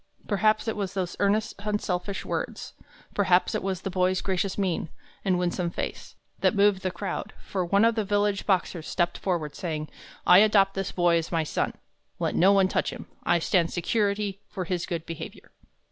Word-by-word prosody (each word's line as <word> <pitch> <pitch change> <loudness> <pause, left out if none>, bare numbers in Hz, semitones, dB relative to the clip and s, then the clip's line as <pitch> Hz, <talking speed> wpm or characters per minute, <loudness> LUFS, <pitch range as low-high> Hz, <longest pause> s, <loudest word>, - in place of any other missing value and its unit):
Perhaps 215 +2 +2
it 225 - 0
was 195 -2 -3
those 185 -3 -2
earnest, 210 +2 +2
unselfish 200 -2 -2
words, - - -4 0.4
perhaps 185 -3 +3
it - - -1
was 190 -2 -2
the 195 - -3
boy's 185 0 +2
gracious 190 0 -1
mien 185 -5 -1 0.3
and 185 -2 +2
winsome 175 0 0
face, - - -5 0.2
that - - +2
moved 200 -1 +4
the 185 - -1
crowd; 185 +2 -4
for 190 -2 -3
one 200 +5 +3
of 230 - +4
the 220 -1 0
village 205 0 0
Boxers 180 -4 0
stepped 175 -1 0
forward, 170 -6 -1
saying: 155 -4 -4 0.4
"I 180 - +8
adopt 200 -2 +5
this 195 0 -3
boy 175 -1 +3
as 165 - -6
my 165 -2 +1
son. 155 - -1 0.4
Let - - -1
no 190 +3 +5
one 195 -1 +5
touch - - 0
him. - - -8 0.2
I 175 - +4
stand 170 0 +2
security 200 +1 0
for 185 - -4
his 175 -1 -2
good 170 -3 -3
behavior." 165 -1 -8
190 Hz, 185 wpm, -27 LUFS, 175-200 Hz, 0.4 s, I